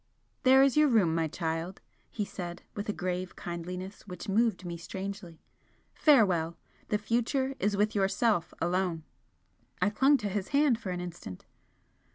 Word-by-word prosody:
"There 265 +1 +6
is 275 -2 +3
your 300 0 +5
room, 210 - +3
my 165 -1 +1
child," 165 +3 -3 0.3
he 210 - -3
said, 175 -3 -7
with 205 +1 -5
a - - +3
grave 185 -1 -3
kindliness 180 +3 -6
which 180 -3 -8
moved 210 -2 +1
me 170 -1 -4
strangely 190 0 -7 0.5
"Farewell! 185 - +3 0.3
The 210 - +1
future 240 +5 0
is 205 0 +1
with 210 +1 +2
yourself 195 -1 +1
alone." 175 -1 0 0.8
I 200 +3 +2
clung 270 +6 +4
to 210 - -3
his 195 -1 -2
hand 285 -5 +3
for 200 - -6
an 180 -1 -3
instant. 175 - -8
195 Hz, 155 wpm, -30 LUFS, 175-225 Hz, 0.8 s, There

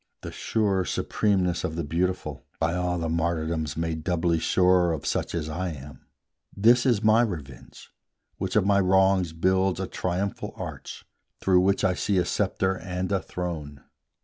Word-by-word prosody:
The - - -6
sure 100 -4 0
supremeness 90 -2 0
of 80 -3 -3
the 85 - -2
Beautiful, 85 -1 -2 0.2
By 80 +1 +1
all 90 0 -1
the 85 -1 -2
martyrdoms 80 -1 -1
made 80 -1 -2
doubly 85 -1 +1
sure 90 0 +3
Of 75 - -5
such - - -1
as 80 -2 -2
I 85 +2 -3
am, 70 -2 -12 0.5
this 120 +5 +5
is 115 -4 +2
my 110 +2 +5
revenge, 75 - -6 0.5
Which 95 -1 -3
of 105 -3 +4
my 100 0 +4
wrongs 95 -2 +3
builds 95 +3 +1
a 95 - -1
triumphal 90 +2 -3
arch, - - -8 0.3
Through 95 -1 +4
which 95 +2 +2
I 95 - +3
see 100 +2 0
a 90 - +2
sceptre 95 -1 0
and 90 +2 -4
a 95 -2 +1
throne. 80 -7 -6
90 Hz, 165 wpm, -26 LUFS, 80-95 Hz, 0.5 s, this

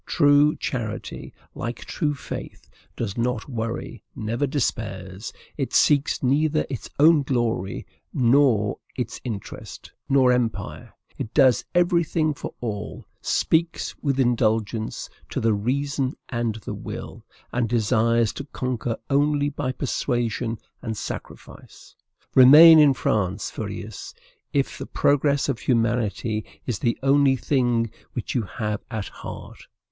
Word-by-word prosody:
True 145 -1 +4
charity, 110 -4 -5 0.2
like 120 +2 -5
true 150 -3 -1
faith, - - -8 0.3
does 115 -1 -3
not 120 -1 -1
worry, 115 -3 -4
never 115 +6 -1
despairs; 100 -7 -3 0.3
it 135 -3 -2
seeks 145 -2 +3
neither 150 +4 +2
its 130 - -5
own 155 +1 +6
glory, 120 -8 -1 0.3
nor 120 -5 +3 0.2
its 125 -3 -4
interest, 110 -6 -7 0.2
nor 135 -2 +5
empire; 125 -2 -2 0.3
it 110 - -4
does 130 -6 +5
every 175 -1 +4
thing 155 -1 0
for - - -8
all, 105 -3 -5 0.2
speaks 165 +1 0
with 135 -2 0
indulgence 110 -3 0 0.2
to - - -2
the 115 -1 +2
reason 135 +5 -1
and 120 -3 -1
the - - -4
will, - - -7 0.3
and 120 -2 0
desires 115 0 +2
to 140 - -6
conquer 125 -4 -3
only 145 +1 +2
by 145 -2 -3
persuasion 120 -3 -2 0.2
and 110 -3 -4
sacrifice. - - -9 0.4
Remain 155 +5 +10
in 145 -3 +6
France, 100 -5 -1
Fourierists, 105 0 -7 0.4
if 140 -1 -1
the - - -6
progress 140 0 +2
of 135 -4 -1
humanity 115 -2 0 0.2
is 120 -6 -2
the 115 - 0
only 140 0 +4
thing 120 -4 +1 0.2
which - - -4
you 125 - +1
have 105 +1 -4
at 110 -4 -3
heart! - - -10
125 Hz, 125 wpm, -24 LUFS, 110-140 Hz, 0.4 s, Remain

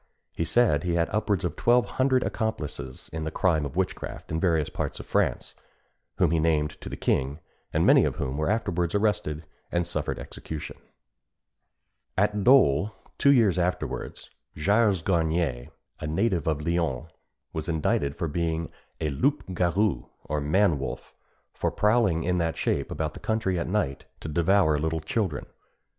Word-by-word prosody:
He 85 - -1
said 100 -7 +3
he 85 -1 0
had 85 -1 +1
upwards 105 -4 0
of 90 - -2
twelve 120 +1 +3
hundred 130 -1 +1
accomplices 75 - -4
in 80 -1 -3
the 80 - -2
crime 80 -4 +1
of 70 - -11
witchcraft - - -3
in 80 - 0
various 80 -4 +2
parts - - -3
of - - -8
France, - - 0 0.6
whom - - +3
he 85 - +2
named 75 -2 0
to - - -6
the - - -6
king, 70 +3 0 0.3
and - - +2
many - - +7
of - - 0
whom 65 0 -3
were 75 +1 0
afterwards 90 -5 0
arrested 95 -7 0 0.3
and 85 0 +1
suffered 85 - -3
execution. 80 -2 -7 1.4
At 105 +2 +3
Dôle, 105 - +4 0.3
two 140 - +6
years 110 -9 +4
afterwards, 90 +1 -3 0.3
Gilles 100 +1 +3
Garnier, 80 -8 0 0.3
a 75 - -4
native 85 +1 0
of 75 -1 0
Lyons, 85 -4 0 0.5
was 80 +1 -3
indicted 75 -3 0
for 85 - -2
being 80 +1 -2 0.3
a 75 - -1
loup 110 - +1
garou, 90 +3 +1 0.2
or 75 0 -2
man 80 +1 +3
wolf, 65 - -6 0.4
and - - -32
for - - +1
prowling 105 -6 +2
in 90 +1 +1
that 80 -1 -1
shape - - 0
about 80 -1 -3
the - - -10
country 110 -5 0
at 85 - -2
night 90 -9 -1
to - - -7
devour 85 0 +3
little 80 +1 -1
children. 85 -1 -2
85 Hz, 165 wpm, -27 LUFS, 75-100 Hz, 1.4 s, many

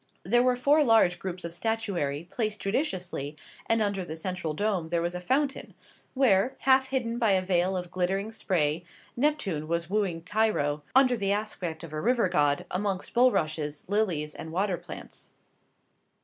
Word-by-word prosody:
There 240 +7 +3
were 250 0 +3
four 285 +5 +4
large 220 -8 +4
groups 185 -1 -5
of 170 0 -5
statuary, 175 -8 -2
placed 215 -3 -2
judiciously, 185 - -2 0.3
and 225 -1 +3
under 200 -2 -1
the 160 -2 -6
central 165 -2 -3
dome 195 -4 -1
there 170 0 +1
was 170 +1 -1
a 180 - -5
fountain, 270 +7 -1 0.4
where, 245 -3 +3
half 265 0 +4
hidden 240 -3 -2
by 225 -5 +3
a 190 - +3
veil 185 0 +1
of 180 -1 -5
glittering 190 +4 -1
spray, 170 -7 0 0.3
Neptune 240 - 0
was 170 +2 -2
wooing 190 -6 0
Tyro, 180 -8 +1
under 260 -2 +6
the 200 -3 -1
aspect 190 -6 -3
of 160 -2 -9
a 155 - -3
river 235 -3 +2
god, 145 -5 +2
amongst 195 0 -2
bulrushes, 155 -11 +1
lilies, 180 -7 0
and 160 - -8
water 190 +2 0
plants. - - -10
190 Hz, 165 wpm, -28 LUFS, 170-225 Hz, 0.4 s, under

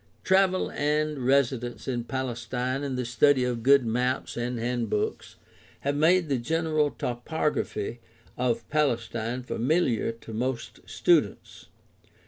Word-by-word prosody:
Travel 190 0 +3
and 150 0 0
residence 130 -3 +1
in 120 -3 -2
Palestine 130 +1 -3
and 135 -2 -3
the 125 - -2
study 130 +3 +3
of 120 -2 -1
good 140 +1 +5
maps 125 +3 -1
and 120 +1 -2
handbooks 115 -3 -2 0.5
have 140 +1 -1
made 165 +3 +4
the 135 -3 0
general 155 +3 +1
topography 120 -4 -2 0.4
of 120 -3 -1
Palestine 120 -4 -1
familiar 125 -2 +1
to 115 0 -11
most 120 +2 -3
students. - - +1
125 Hz, 115 wpm, -27 LUFS, 120-145 Hz, 0.5 s, good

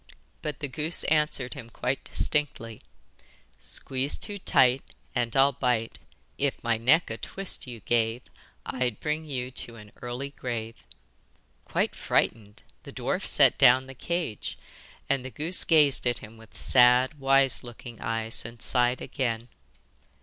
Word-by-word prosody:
But 150 -1 -5
the 145 - -2
goose 155 +5 -1
answered 150 -5 +1
him 125 -6 -9
quite 130 +3 -2
distinctly: 115 -7 -2 0.8
'Squeeze 130 - -2
too 205 -1 -4
tight 130 -6 +4 0.3
And 120 -3 -1
I'll 135 +1 +5
bite, 120 -3 -1 0.4
If 140 -1 +1
my 115 0 +2
neck 130 +6 +3
a 115 - -4
twist 195 -2 -2
you 120 -3 -8
gave 115 +3 0 0.4
I'd 125 -4 -2
bring 155 +1 -2
you 130 -4 -4
to 120 -2 -3
an 105 -2 -13
early 125 +3 -5
grave.' 115 - -6 0.8
Quite - - 0
frightened, 105 -2 -1 0.2
the - - -11
dwarf - - -2
set - - +5
down 130 +2 +6
the 135 - -10
cage, 165 - -3 0.5
and 135 -2 0
the 130 - -6
goose 160 +7 +1
gazed 150 -6 +4
at 120 - +1
him 110 +1 -9
with 110 -1 -16
sad 125 +3 +4
wise 135 -1 +3
looking 120 -1 -10
eyes 115 0 -2
and 115 +1 -9
sighed 125 +1 +1
again. 120 -3 -3
125 Hz, 145 wpm, -27 LUFS, 115-140 Hz, 0.8 s, down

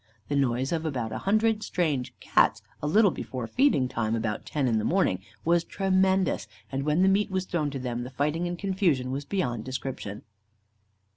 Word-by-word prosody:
The 145 - 0
noise 130 -1 +1
of 165 -2 0
about 125 -8 -2
a - - -3
hundred 215 +2 +2
strange 150 -11 -1
Cats, - - +2 0.2
a 150 - -1
little 205 +5 +5
before 130 -6 -5
feeding 195 - +3
time, 115 -2 -1
about 110 -2 -3
ten 145 -4 0
in 115 -2 +2
the - - -2
morning, 175 - +2 0.3
was 170 +1 +3
tremendous; 190 0 +1 0.2
and 135 0 -1
when 155 +4 +3
the - - +5
meat 200 +2 +3
was 190 -1 -1
thrown 165 -5 -1
to 140 - -5
them, 120 -1 -3
the 125 - -6
fighting 150 +6 -1
and 175 0 -3
confusion 175 -10 +1
was 140 +2 -3
beyond 125 - -1
description. 130 -5 -5
150 Hz, 190 wpm, -27 LUFS, 125-190 Hz, 0.3 s, little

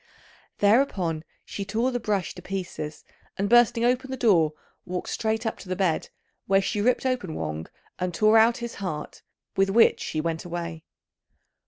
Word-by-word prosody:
Thereupon, 200 - +2 0.2
she 200 - -5
tore 225 +6 0
the 245 - -1
brush 210 -4 -1
to - - -10
pieces, 180 -5 -5 0.3
and 200 - 0
bursting 240 +1 +5
open 255 +2 +1
the 265 - -4
door, 170 -11 +4 0.3
walked 180 0 -4
straight 220 +1 -1
up 220 - -2
to 185 - -11
the 185 - -1
bed, 180 -4 0 0.4
where 195 0 +4
she 205 +2 -1
ripped 250 +4 +2
open 245 -11 -1
Wang 80 0 -4 0.3
and 180 0 -1
tore 215 +5 +5
out 230 +1 +4
his 235 -1 -5
heart, 155 -6 -5 0.3
with 195 0 +3
which 225 +4 +5
she 155 - -3
went 160 0 -2
away. 170 -2 -5
195 Hz, 170 wpm, -26 LUFS, 170-230 Hz, 0.4 s, bursting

